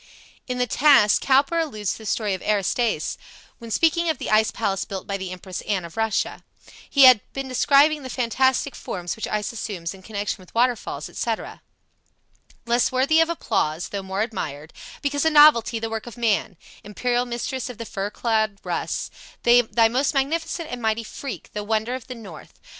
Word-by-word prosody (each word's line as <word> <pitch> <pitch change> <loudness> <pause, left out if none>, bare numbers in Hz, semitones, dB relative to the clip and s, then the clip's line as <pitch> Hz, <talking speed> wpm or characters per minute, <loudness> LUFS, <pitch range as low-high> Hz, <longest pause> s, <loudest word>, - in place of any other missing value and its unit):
In 250 -1 -3
"The 250 - +1
Task," 250 -4 +5
Cowper 275 +5 +3
alludes 215 - -2
to - - -5
the 220 - -11
story 210 -1 0
of 185 - -4
Aristaeus, 215 +3 0 0.4
when 230 -2 -9
speaking 330 +7 +2
of 315 - 0
the - - -4
ice 215 0 +4
palace 195 -4 -2
built 195 -1 -6
by 200 - -3
the 190 -1 -5
Empress 185 0 -7
Anne 195 -4 -2
of 170 - -11
Russia. 225 -2 -1 0.5
He 280 - +5
has 255 -2 +10 0.2
been 270 0 -4
describing 285 +4 +4
the 260 - -7
fantastic 260 +2 +1
forms 175 -1 -5
which 220 - -4
ice 210 -1 -2
assumes 195 -7 -5
in 190 - -14
connection 205 0 -4
with 185 - -18
waterfalls, 245 0 0
etc.: - - -4 1.0
"Less 235 +1 +2
worthy 270 +5 +3
of 325 - +2
applause 165 - -1
though 200 - -4
more 190 +2 -2
admired 155 -9 -6 0.3
Because 285 0 0
a 320 - +4
novelty, 295 -7 +6
the 225 0 -3
work 225 +1 -5
of 240 - -9
man, 215 -5 0 0.3
Imperial 245 +4 -1
mistress 245 +2 -4
of 245 - -8
the 230 - -6
fur 200 -1 -4
clad 220 -2 0
Russ, - - -3 0.3
Thy 240 -1 +5
most 260 +5 0
magnificent 320 +4 -1
and 245 -1 -5
mighty 220 0 0
freak, 265 +3 -8
The 210 - -4
wonder 220 +3 -1
of 255 -1 -6
the 255 - -7
north. 195 -9 -12
230 Hz, 185 wpm, -23 LUFS, 205-260 Hz, 1.0 s, has